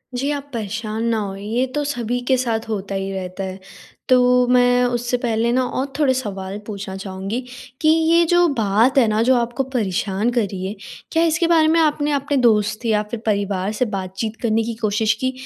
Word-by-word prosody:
जी 275 +4 -1
आप 285 0 -5
परेशान 220 0 -3
ना 225 - +1
हों 195 -2 -4
ये 225 +6 -1
तो 295 - 0
सभी 245 -3 -2
के 260 - +4
साथ 230 -3 -2
होता 195 -2 -3
ही 195 0 -3
रहता 185 0 -5
है। 190 0 -6 0.5
तो 250 0 +4
मैं 245 0 +4
उससे 245 0 -1
पहले 235 -1 0
न 255 - +2
और 255 +2 -1
थोड़े 270 -3 +3
सवाल 195 -5 -4
पूछना 200 -2 -6
चाहूँगी, 195 +4 -4 0.4
कि 310 - +2
ये 325 +1 +4
जो 350 +1 +4
बात 230 0 +2
है 240 -4 +5
न 220 - +2
जो 255 +1 +4
आपको 240 +3 0
परेशान 215 -3 -1
कर 240 -1 +1
रही 190 -1 -5
है, 205 - -5 0.4
क्या 325 +1 +2
इसके 335 +1 +2
बारे 320 -2 +4
में 330 +1 +3
आपने 295 -1 +1
अपने 280 0 0
दोस्त 215 -1 +2
या 215 -2 +2
फिर 235 - -3
परिवार 200 -2 0
से 230 +4 0
बातचीत 195 +2 -4
करने 225 -1 +1
की 230 0 -4
कोशिश 215 +1 +2
की, 260 +4 -2
230 Hz, 200 wpm, -20 LUFS, 205-260 Hz, 0.5 s, है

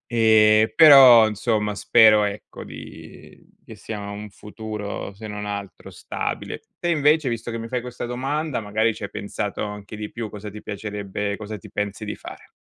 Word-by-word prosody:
E 110 -1 +5
però, 135 -7 +9
insomma, 105 0 -1
spero, 105 +1 +5
ecco, 100 0 -6
di - - -12 0.3
che - - -12
sia 110 -2 -7
un 105 +1 -7
futuro 105 -1 -7
se 110 +2 -10
non 105 0 -6
altro 100 -1 -7
stabile. - - -5 0.2
Te 175 - -1
invece, 150 -2 +3
visto 115 0 -4
che 115 - -4
mi 115 - -6
fai 125 +2 -2
questa 125 0 -7
domanda, 135 +4 -2
magari 110 +1 0
ci 105 - -8
hai 100 - -6
pensato 105 -1 -4
anche 105 0 -8
di 105 0 -6
più. 115 -2 -5
Cosa 105 0 -8
ti 105 +1 -10
piacerebbe 100 -1 -5
cosa 105 0 -6
ti 95 - -14
pensi 105 +1 -4
di 105 - -4
fare? - - -12
110 Hz, 175 wpm, -23 LUFS, 105-115 Hz, 0.3 s, però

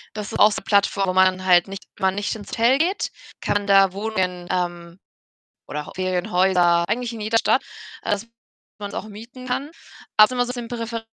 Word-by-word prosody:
Das 210 -1 -5
ist - - -4
auch 210 - +6
so - - -4
Plattform, 200 -2 +2
wo - - +1
man 185 0 +3
halt 175 -2 +5
nicht 195 0 -8
man 190 0 +1
nicht 205 +1 -2
ins 205 -2 -11
Hotel 235 +4 +3
geht, 360 +6 0 0.3
kann 205 0 -1
da 195 -1 +5
Wohnungen, 190 -4 -2
ähm, 175 -1 -3 0.7
oder 150 0 -5
auch - - -10
Ferienhäuser 180 -1 +2
eigentlich 240 +2 -2
in 225 - -7
jeder 220 +2 +1
Stadt. - - +2 0.4
Das 205 +2 -2 0.5
man’s 205 -1 -6
auch - - -5
mieten 235 +5 -11
kann. 270 +4 -3 0.5
Aber 215 - +10
ist - - -12
immer 245 -1 +1
so 245 - -4
'n 235 - -6
bisschen 230 -1 -4
200 Hz, 195 wpm, -22 LUFS, 185-230 Hz, 0.7 s, Aber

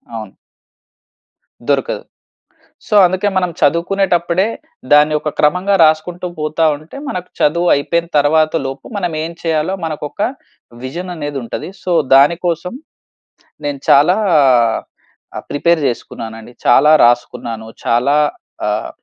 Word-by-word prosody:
అవును. 110 -4 -8 1.3
దొరకదు. - - 0 0.8
సో 210 - 0
అందుకే 185 +3 0
మనం 180 -1 +1
చదువుకునేటప్పుడే, 175 +3 +1 0.5
దాన్ని 150 +1 +5
ఒక 150 - -3
క్రమంగా 180 +6 +2
రాసుకుంటూ 170 +3 +1
పోతా 155 +1 0
ఉంటే 155 - -13
మనకు 180 -1 -5
చదువు 170 +4 +2
అయిపోయిన 170 +4 -1
తర్వాతలోపు, 145 -2 +1
మనం 175 -4 -2
ఏం 165 - -5
చేయాలో 160 +2 0
మనకు 155 -2 -5
ఒక 205 - -8 0.6
విజన్ 175 +7 -6
అనేది 145 -2 -5
ఉంటది. 115 - -6
సో 180 - -3 0.2
దానికోసం 170 - +2 0.9
నేను 145 -2 -3
చాలా 150 +6 +5 1.2
ఆహ్, - - -6
ప్రిపేర్ 170 +3 +1
చేసుకున్నానండి, 115 -1 -6
చాలా 140 +5 +5
రాసుకున్నాను 115 -2 -1 0.2
చాలా 125 +5 +2 0.5
ఆహ్, 105 +1 -2
155 Hz, 110 wpm, -16 LUFS, 140-175 Hz, 1.3 s, దాన్ని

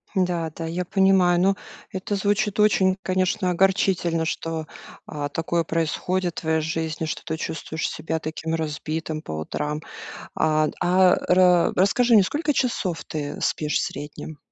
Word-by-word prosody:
Да, 175 -3 0
да, 165 - -5
я 175 +2 -3
понимаю. 190 -2 +4
Но 195 +2 +3 0.4
это 190 +2 -3
звучит 205 +2 0
очень, 190 -3 +4
конечно, 185 0 0
огорчительно, 180 -3 +2
что, 160 0 -3 0.4
а, 145 -1 -4
такое 165 +2 -1
происходит 170 +3 -1
в - - -13
твоей 160 -1 +1
жизни, 160 0 -2
что 155 - -4
ты 160 - -3
чувствуешь 160 0 -3
себя 160 +1 -3
таким 160 +1 -3
разбитым 155 0 -3
по 80 - -7
утрам. 150 - -3 0.5
А 155 0 +2
д - - -6
а, 185 0 +4
ра 180 -1 +4
расскажи 235 +6 +3
мне, - - +9
не - - +5
сколько 295 - -1
часов 195 -11 -1
ты 145 -2 -5
спишь 150 -1 0
в - - 0
среднем? 150 +2 -7
170 Hz, 155 wpm, -24 LUFS, 160-185 Hz, 0.5 s, мне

